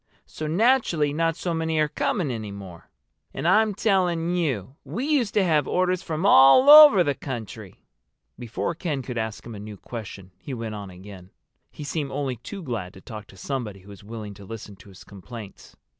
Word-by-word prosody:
So 155 - -6
naturally 175 - +2
not 165 +1 0
so 175 0 -3
many 160 -1 -1
are 155 0 +3
coming 150 0 -1
any 110 -3 -5
more. 95 -4 -11 0.5
And - - -2
I'm 210 +2 +3
telling 180 -5 +1
you 135 - -2
we 245 +5 -4
used 275 -8 0
to 205 - +4
have 155 -5 +2
orders 185 0 +1
from 160 +1 -3
all 200 - +7
over 295 -11 +10
the 145 - 0
country!" 115 -7 -8 0.5
Before 120 +7 -3
Ken 155 -5 -3
could 125 -2 -4
ask 110 -1 -5
him 115 - -8
a 105 - -8
new 105 0 -9
question 100 -5 -9
he 135 - -6
went 115 -2 -5
on 100 -2 -7
again. 95 0 -12 0.4
He - - -10
seemed 145 -1 -3
only 135 -3 -3
too 185 - -8
glad 110 - -5
to 95 - -13
talk 105 -1 -9
to 95 - -17
somebody 105 -4 -5
who 95 - -17
was 100 -1 -12
willing 105 -1 -8
to 100 +1 -13
listen 105 0 -9
to 100 0 -16
his 95 - -14
complaints. 100 +1 -11
135 Hz, 195 wpm, -24 LUFS, 105-170 Hz, 0.5 s, over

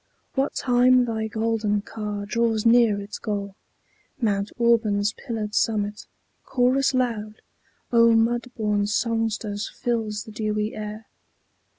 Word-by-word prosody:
What 275 +1 0
time 250 0 +4
thy 220 -2 -2
golden 220 -2 0
car 210 -2 -5
draws 225 0 0
near 230 -3 +5
its 200 +1 -7
goal, 200 -2 -3 0.7
Mount 205 -4 0
Auburn's 215 -3 +2
pillared 220 -4 -5
summit, 210 -2 0 0.4
chorus 260 +1 +2
loud 220 -4 -2 0.5
Of 230 -1 +5
mud 240 +2 +1
born 210 -2 +1
songsters 215 -2 -1
fills 225 -4 -2
the 220 - -11
dewy 215 0 -2
air. 215 +1 -6
220 Hz, 115 wpm, -24 LUFS, 210-235 Hz, 0.7 s, near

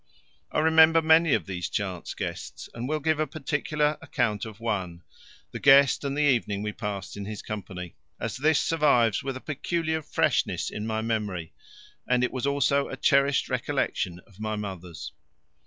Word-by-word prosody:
I - - -2
remember 160 +1 +6
many 160 -1 +5
of - - -2
these 90 -2 -4
chance 95 -4 -4
guests, - - -6
and 120 +3 -5
will 155 0 0
give 155 +1 +1
a 155 - +1
particular 150 +1 -1
account 115 -5 -1
of 110 -1 -10
one 95 -7 -3 0.5
the - - -6
guest 140 0 +6
and 140 0 -2
the 150 - +2
evening 115 -7 +1
we 105 - -2
passed 105 -2 -5
in 100 -1 -6
his 105 0 -6
company 95 -4 -6 0.3
as 115 -3 -3
this 155 +2 +3
survives 140 -9 +3
with 135 -1 -3
a - - -11
peculiar 160 +2 -2
freshness - - 0
in 105 +1 -4
my 110 0 -1
memory, 105 -7 -2 0.5
and 125 0 +2
it 125 - +1
was 130 +1 -2
also 140 0 +2
a - - -6
cherished 140 0 +3
recollection 90 -1 -1
of 100 -1 -21
my 110 0 -2
mother's. 90 -7 -6
120 Hz, 170 wpm, -27 LUFS, 100-145 Hz, 0.5 s, remember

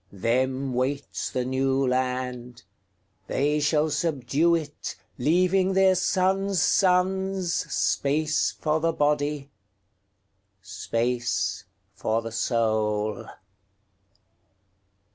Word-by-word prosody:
Them 130 +6 -1
waits 135 +3 -2
the 125 -1 -2
New 135 +1 +1
Land; 125 -1 -2 0.6
They 150 +2 +1
shall 150 +1 +1
subdue 150 +1 +1
it, 150 -3 -5 0.2
Leaving 185 +6 +2
their 190 0 +5
sons' 190 +1 +1
sonsSpace 180 -5 +1
for 155 0 +1
the 165 +1 0
body, 145 -1 0 1.1
Space 115 +6 -2 0.3
for 110 +2 -1
the 115 - -6
soul. 110 -2 0
140 Hz, 80 wpm, -25 LUFS, 125-170 Hz, 1.1 s, their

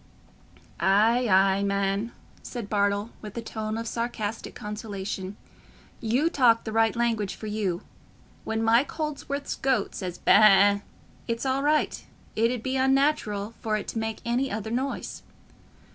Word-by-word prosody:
"Ay, 225 +6 +4
ay, 195 +1 +4
man," 200 +2 0 0.3
said 235 -5 -7
Bartle, 205 +1 +1
with 210 +1 -9
a - - -2
tone 220 -1 -4
of 230 0 -4
sarcastic 225 -2 -4
consolation, 205 -3 -5 0.6
"you 245 +7 +1
talk 245 -8 +4
the 220 - -5
right 225 +1 +2
language 225 -4 0
for - - -9
you. 210 -5 -2 0.6
When 220 0 -2
Mike 230 +5 +3
Holdsworth's 290 -2 -3
goat 260 -7 0
says 180 -3 -5
ba - - +1
a - - +9 0.4
a, - - -12 0.5
it's 230 +2 -2
all 265 +1 +1
right—it 285 -5 0
'ud 245 -3 -4
be 260 0 -1
unnatural 265 -6 +1
for 215 -1 0
it 210 - -6
to 225 - -3
make 220 0 -3
any 245 +3 0
other 220 +1 -4
noise." 265 +3 -3
225 Hz, 145 wpm, -26 LUFS, 205-245 Hz, 0.6 s, a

